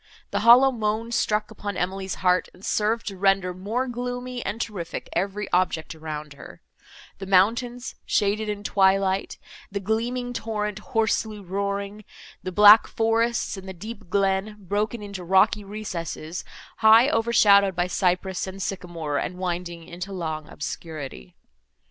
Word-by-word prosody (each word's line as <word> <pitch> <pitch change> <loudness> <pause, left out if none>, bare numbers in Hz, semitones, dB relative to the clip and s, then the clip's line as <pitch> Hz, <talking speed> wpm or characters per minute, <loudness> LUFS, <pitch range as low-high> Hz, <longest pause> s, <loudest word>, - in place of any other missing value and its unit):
The - - 0
hollow 250 +3 +7
moan 225 0 -2
struck 210 -2 0
upon 205 -2 -5
Emily's 190 +1 -2
heart, 180 0 +3
and 185 - -12
served 220 +2 0
to 195 - -9
render 195 -2 +2
more 210 +8 -2
gloomy 245 0 -4
and 215 - -4
terrific 195 -8 -5
every 195 +3 -2
object 175 -3 +1
around 155 -2 -7
her,—the 185 +6 -14
mountains, 235 +6 +2
shaded 210 +1 0
in 205 -1 -4
twilight—the 195 0 0
gleaming 240 +5 -2
torrent, 210 -2 -3
hoarsely 220 -1 -1
roaring—the 200 0 -5
black 210 +3 +8
forests, 230 -1 0
and 190 0 -9
the - - -5
deep 210 +1 -9
glen, 195 +2 +1
broken 210 +3 -2
into 200 -3 -7
rocky 190 +4 +3
recesses, 180 -5 -5 0.3
high 225 +3 +7
overshadowed 210 -6 +4
by 175 0 +1
cypress 180 +1 0
and 190 +1 -7
sycamore 170 -6 -3
and 180 - -4
winding 175 -2 -4
into 180 +4 -7
long 160 -4 -4
obscurity. 145 - -7
200 Hz, 130 wpm, -25 LUFS, 180-220 Hz, 0.3 s, black